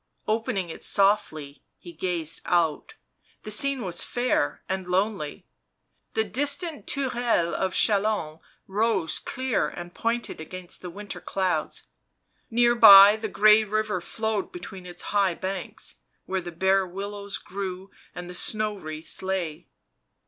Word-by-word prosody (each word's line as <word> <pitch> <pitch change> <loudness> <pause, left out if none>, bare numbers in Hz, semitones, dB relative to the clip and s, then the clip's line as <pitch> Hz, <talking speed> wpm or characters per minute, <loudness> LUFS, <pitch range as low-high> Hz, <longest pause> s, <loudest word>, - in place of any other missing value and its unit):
Opening 215 -4 -1
it - - -8
softly, 175 -9 +1 0.2
he 175 - -12
gazed 165 -2 -3
out; 175 - 0 0.5
the 215 - -6
scene 275 +4 +2
was 175 -3 -1
fair 255 +5 -1
and 190 -1 -3
lonely 185 -4 -1 0.3
— - - -49
the 220 - +3
distant 285 - -3
tourelles 240 - 0
of 190 +3 -1
Chalons 205 -7 +1 0.3
rose 195 -5 0
clear 260 -1 -1
and 175 0 -8
pointed 230 -6 -2
against 180 +2 -10
the 180 - -6
winter 205 +4 -7
clouds; 190 -2 -2 0.7
near 240 +1 +4
by 205 -3 +10
the 220 0 -4
grey 210 +2 +5
river 215 -3 -1
flowed 220 +2 -2
between 195 - -9
its 175 0 -7
high 195 -4 +2
banks, 195 +4 -6 0.3
where 190 0 -2
the 175 0 -7
bare 190 +2 +2
willows 200 +2 -5
grew 190 -1 -6 0.3
and 180 0 -7
the 180 - -8
snow 215 +3 0
wreaths 155 -4 -7
still 190 - -4
lay. 175 -4 -3
195 Hz, 140 wpm, -26 LUFS, 180-220 Hz, 0.7 s, by